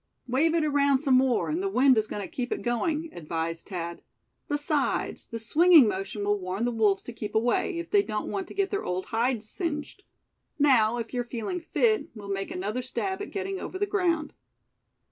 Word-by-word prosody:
"Wave 300 +7 +2
it 325 -2 +2
around 280 -2 +3
some 270 -1 +1
more, 255 -1 +3
and 320 +4 -1
the 390 - -1
wind 265 -5 +5
is 220 -1 +1
going 205 - -4
to - - -5
keep 260 -7 -4
it - - -2
going," 305 +7 -1
advised 165 0 -4
Thad; 170 -3 -5 0.5
"besides, 290 0 0
the 230 - -5
swinging 310 +5 +6
motion 195 +1 -3
will 205 0 +1
warn 185 +4 -2
the 245 - 0
wolves 210 -4 +2
to 240 - -8
keep 210 -2 -6
away, 240 - +1
if 340 0 -6
they 410 - +5
don't 215 - -4
want 385 -2 -3
to - - -11
get 395 -1 0
their 400 - -1
old 180 +1 -2
hides 230 -1 -1
singed. 310 - -4 0.6
Now, 240 -6 +4
if 230 0 -5
you're 245 -1 0
feeling 240 - -4
fit, 430 -1 +1
we'll 205 -2 -9
make 195 0 -2
another 205 +7 -3
stab 380 +10 -3
at 410 - -5
getting 390 -1 -3
over 375 - -5
the 410 - +1
ground." 350 -6 0
255 Hz, 200 wpm, -27 LUFS, 215-330 Hz, 0.6 s, swinging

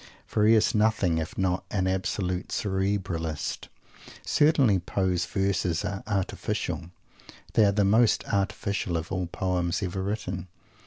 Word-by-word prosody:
for 105 0 +2
he 115 - +7
is 110 - +3
nothing 105 -6 +2
if 80 - -5
not 95 -1 0
an 95 -3 0
absolute 95 -1 -1
"Cerebralist." 95 -5 -2 0.6
Certainly 140 - +4
Poe's 90 0 -1
verses 95 -2 0
are 100 0 -3
"artificial." 95 -3 -2 0.6
They 110 - +5
are 100 - +4
the 100 0 +2
most 110 +3 +4
artificial 100 -2 -1
of 80 0 -5
all 90 -1 -1
poems 90 0 -1
ever 95 +1 -2
written. 95 -3 -3
95 Hz, 135 wpm, -27 LUFS, 90-105 Hz, 0.6 s, he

